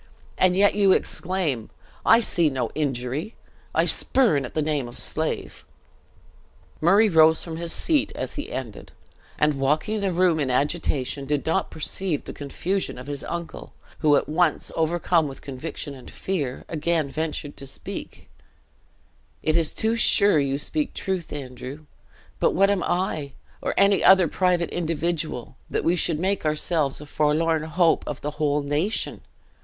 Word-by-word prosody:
And 185 0 +3
yet 200 +1 +5
you 200 -2 +4
exclaim, 165 - -1 0.4
'I 230 - +7
see 170 -7 +2
no 130 -2 -2
injury 140 - -2 0.4
I - - +3
spurn 205 - +2
at - - -10
the 155 - +1
name 150 -4 -1
of 120 - -11
slave!'" - - -2 1.2
Murray 195 +7 +5
rose 160 -3 +5
from 165 -2 -6
his 170 0 -4
seat 300 - +1
as - - -4
he 290 - -5
ended, 120 -6 -7 0.4
and 150 -2 +2
walking 155 +10 0
the 195 -2 0
room 175 -2 +2
in 140 -3 0
agitation, 140 -1 0
did 145 0 -1
not 160 - 0
perceive 160 0 -2
the - - -8
confusion 180 +7 -3
of 125 - -8
his 145 -1 -5
uncle, 170 -1 -6 0.3
who, 150 -2 +4
at - - +1
once 160 0 +1
overcome 165 0 +1
with 135 - -10
conviction 140 +1 -6
and 130 -2 -12
fear, 145 -10 -3
again 165 -1 0
ventured 155 0 -4
to 135 - -8
speak: - - -8 1.2
"It 155 - +1
is 165 -2 +3
too 225 +1 0
sure 200 -6 +5
you 140 -1 0
speak 295 - -2
truth, 190 -4 -3
Andrew; 135 +2 -7 0.5
but - - +2
what 195 +1 +4
am 200 -3 0
I, 155 -7 -1 0.3
or - - -2
any 200 0 +4
other 190 -2 +7
private 180 0 +1
individual, 165 -6 -3
that - - -1
we 170 - +2
should 165 -2 +1
make 190 +2 0
ourselves 155 -2 0
a - - -8
forlorn 155 +2 +1
hope 165 +1 +2
for 150 - -3
the 150 - -4
whole 145 -1 +1
nation? 150 +10 -1
160 Hz, 160 wpm, -24 LUFS, 145-180 Hz, 1.2 s, I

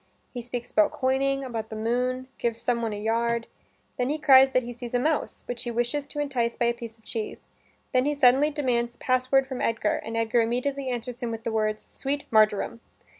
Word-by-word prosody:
He 245 - -4
speaks 240 0 -6
about 210 - +4
coining, 275 +1 0
about 230 -4 -4
the 220 - -6
moon, 250 +3 -1
gives 230 -1 -1
some 235 0 0
one 225 -1 -1
a 205 - -4
yard 230 +2 0 0.5
then 250 - +1
he 300 - 0
cries 270 -3 +7
that 255 -1 +1
he 245 +1 -6
sees 245 0 -6
a - - +3
mouse, 305 +4 -1
which 245 -1 -4
he 240 - -4
wishes 240 +5 -1
to 295 - -6
entice 250 -5 0
by 240 - 0
a 235 - +3
piece 235 -1 -9
of 225 - -29
cheese. 220 -1 -5 0.5
Then 255 0 +3
he 295 0 +1
suddenly 275 +2 +5
demands 245 -5 0
the - - -29
password 255 +1 +2
from 265 -1 -5
Edgar, 225 -2 +1
and 225 +1 -5
Edgar 230 +1 +2
immediately 260 +4 -1
answers 245 0 -4
him 240 - -2
with 225 0 -5
the 230 - -2
words 215 -1 -1
"Sweet 280 +1 -3
marjoram." 215 +1 +3
245 Hz, 220 wpm, -26 LUFS, 230-265 Hz, 0.5 s, cries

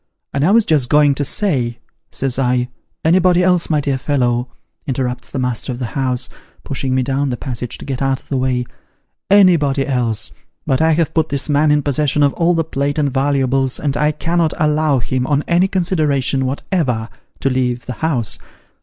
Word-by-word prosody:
' - - -55
And 140 +1 0
I 165 - +4
was 220 +1 +4
just 145 -6 +2
a - - -27
going 150 -1 +5
to 145 - -2
say,' 130 - -1 0.3
says 135 -1 -1
I 125 -1 +1 0.2
' - - -30
Anybody 180 +1 +4
else, 180 -2 +2
my 155 -2 +2
dear 140 -2 -1
fellow,' 125 -3 0 0.4
interrupts 125 -2 -3
the - - -5
master 125 0 -2
of 120 - -5
the 120 -3 -5
house, 130 -3 -1 0.4
pushing 135 -1 -2
me 130 - +2
down 135 +2 -1
the 125 - -3
passage 125 -2 -5
to - - -10
get 135 -2 -4
out 135 -1 +1
of - - -25
the 135 - -1
way 125 -1 0 0.3
' - - -53 0.2
anybody 145 -6 +2
else; 120 -4 -1 0.3
but 135 -2 +1
I 160 0 +4
have 165 0 0
put 160 -1 +1
this 140 +1 -2
man 150 +1 +3
in 150 -1 +3
possession 145 +1 +1
of 140 - +3
all 175 0 +2
the 165 - +1
plate 145 -2 -2
and 145 -3 0
valuables, 135 -1 +1
and 140 -2 -1
I 150 0 +2
cannot 165 +1 0
allow 150 -1 +2
him 125 +1 -1
on 145 0 +1
any 175 +2 +3
consideration 150 -8 0
whatever, 130 - -1 0.3
to 135 - +1
leave 125 -1 -1
tho 125 - -4
house. 125 -3 -1
140 Hz, 205 wpm, -18 LUFS, 130-155 Hz, 0.4 s, going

